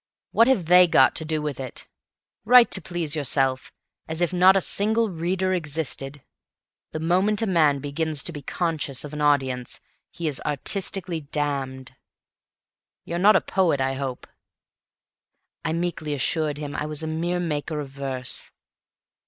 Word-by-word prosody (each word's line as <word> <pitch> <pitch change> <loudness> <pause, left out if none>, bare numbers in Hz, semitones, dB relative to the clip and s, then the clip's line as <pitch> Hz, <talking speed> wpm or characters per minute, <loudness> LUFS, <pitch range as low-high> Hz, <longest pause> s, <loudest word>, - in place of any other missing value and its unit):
What 230 - +4
have 255 -10 +2
they 180 +2 +7
got 135 -5 +5
to 160 - -3
do 155 -1 -1
with 145 -4 -4
it? 130 -2 -6 0.6
Write 245 -1 +7
to 190 - +1
please 170 -4 -3
yourself, 135 -3 0 0.4
as 160 0 -4
if 175 0 0
not 185 +2 +6
a - - +4
single 220 +3 +1
reader 185 +3 -1
existed. 145 -4 -2 0.7
The 155 - -5
moment 185 +6 +1
a - - +2
man 160 -7 +3
begins 145 +2 -2
to - - +1
be 145 -3 -8
conscious 155 -3 -3
of 150 0 -9
an 150 - -4
audience 135 -4 0 0.3
he 170 -1 -5
is 145 -4 -2
artistically 175 +4 -2
damned. 135 -3 -4 1.1
You're 170 +1 -3
not 210 +4 +6
a - - +4
Poet, 175 -7 +1
I 135 0 0
hope?" 135 -2 -5 1.4
I 160 - -1
meekly 165 -3 -2
assured 150 +2 -1
him 145 -1 -6
I 150 - -3
was 155 0 -2
a - - -2
mere 170 +3 -2
maker 155 -2 -3
of 145 -2 -6
verse. 135 -2 -2
155 Hz, 160 wpm, -24 LUFS, 140-175 Hz, 1.4 s, they